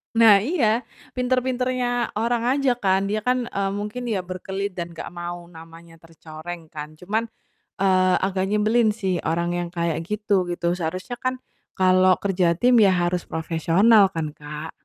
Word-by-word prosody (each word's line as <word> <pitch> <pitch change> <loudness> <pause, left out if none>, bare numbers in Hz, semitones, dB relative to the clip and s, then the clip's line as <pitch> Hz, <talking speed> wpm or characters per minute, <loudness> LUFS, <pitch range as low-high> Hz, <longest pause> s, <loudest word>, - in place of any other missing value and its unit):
Nah 220 -3 +7
iya, 235 - 0 0.3
pinter-pinternya 250 -1 -1
orang 230 +2 0
aja 275 -2 +2
kan, 190 0 +2
dia 215 - 0
kan, 250 +3 0
eee, 195 0 -1
mungkin 210 +4 -5
ya 200 -6 -1
berkelit 190 +2 -4
dan 170 -2 -7
gak - - -7
mau 175 0 -6
namanya 165 0 -14
tercoreng 165 0 -10
kan 150 0 -8
cuman, 215 +7 -2 0.5
eee, 185 -1 +3
agak 190 0 0
nyebelin 215 +1 +2
sih 190 -5 -1
orang 170 +2 0
yang 175 0 -2
kayak 170 -2 -1
gitu, 205 -3 0
gitu 175 0 -1
seharusnya 185 +9 -4
kan, 255 0 -1 0.4
kalau 185 0 +4
kerja 180 -3 +2
tim 245 +5 +4
ya 200 - +6
harus 175 0 -1
profesional 170 +6 +3
kan, 155 -2 -4
Kak? 150 +1 -8
190 Hz, 155 wpm, -23 LUFS, 170-225 Hz, 0.5 s, Nah